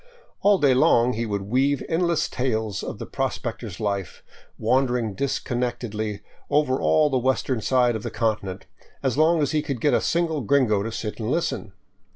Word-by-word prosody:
All 205 0 +5
day 140 -6 +4
long 125 -1 +4
he 115 +1 -2
would 100 -2 -2
weave 135 +7 +1
endless 170 0 +1
tales 110 -5 -2
of - - -5
the - - -6
prospector's 90 - -4
life, 100 -5 -3 0.3
wandering 120 -2 +1
disconnectedly 120 -4 -2 0.3
over 145 -3 +2
all 150 -2 +3
the 130 - +2
western 130 -1 0
side 125 +1 +2
of 110 - -3
the - - -4
continent, 105 -5 -2 0.4
as 130 -3 +1
long 160 +1 +3
as 140 - 0
he 155 -1 +1
could 140 -5 -4
get 145 +5 +2
a - - +3
single 165 -3 0
gringo 120 -4 +2
to 115 +3 -3
sit 110 0 -5
and 110 0 -2
listen. 130 - -2
125 Hz, 175 wpm, -24 LUFS, 110-140 Hz, 0.4 s, All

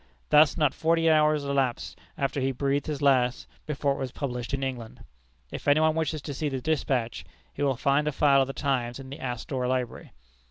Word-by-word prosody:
Thus 150 +2 +5
not 150 -4 +2
forty 165 0 +1
eight - - +6
hours 150 -1 +3
elapsed 135 -3 -1 0.2
after 135 0 -1
he 135 +1 +1
breathed 140 +2 -1
his 150 -2 -3
last, 130 -3 +2 0.2
before 140 -2 0
it - - -6
was 130 -2 -4
published 125 -4 -4
in 135 -1 -2
England. 125 -4 -5 0.5
If - - -7
any 145 +1 +5
one 155 0 +3
wishes 155 -2 -2
to 145 - -5
see 150 +2 -2
the 135 -1 -3
despatch, 130 -5 -1 0.3
he - - -7
will 135 -3 +1
find 140 +3 +1
a - - +1
file 140 -1 +4
of 135 - +1
The 135 - -5
Times 125 -5 -1
in 135 0 -10
the 140 - -8
Astor 125 +1 -3
Library. 125 -2 -3
140 Hz, 210 wpm, -27 LUFS, 130-150 Hz, 0.5 s, eight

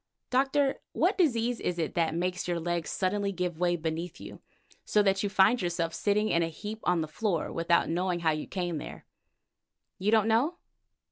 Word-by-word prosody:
Doctor, 270 +1 +2
what 365 +5 +2
disease 245 - +1
is 180 - -2
it 160 -3 -2
that 165 -1 0
makes 180 +1 -2
your 175 -1 0
legs 170 -1 -2
suddenly 200 +1 0
give 180 -3 -3
way 175 -1 +2
beneath 165 +1 -4
you, - - -10 0.4
so 210 - +3
that 195 -1 +2
you 205 - -1
find 200 +5 +4
yourself 170 -2 -1
sitting 210 +1 +1
in 170 - +2
a 165 - +1
heap 210 +7 -7
on 180 -2 +2
the 155 - -3
floor 175 +1 -1
without 170 +1 +2
knowing 175 +1 -1
how 160 -1 +3
you 155 0 -3
came 175 -4 -3
there? - - -9 0.9
You 195 +3 0
don't 220 -1 +4
know? 245 +10 +2
180 Hz, 190 wpm, -29 LUFS, 170-215 Hz, 0.9 s, find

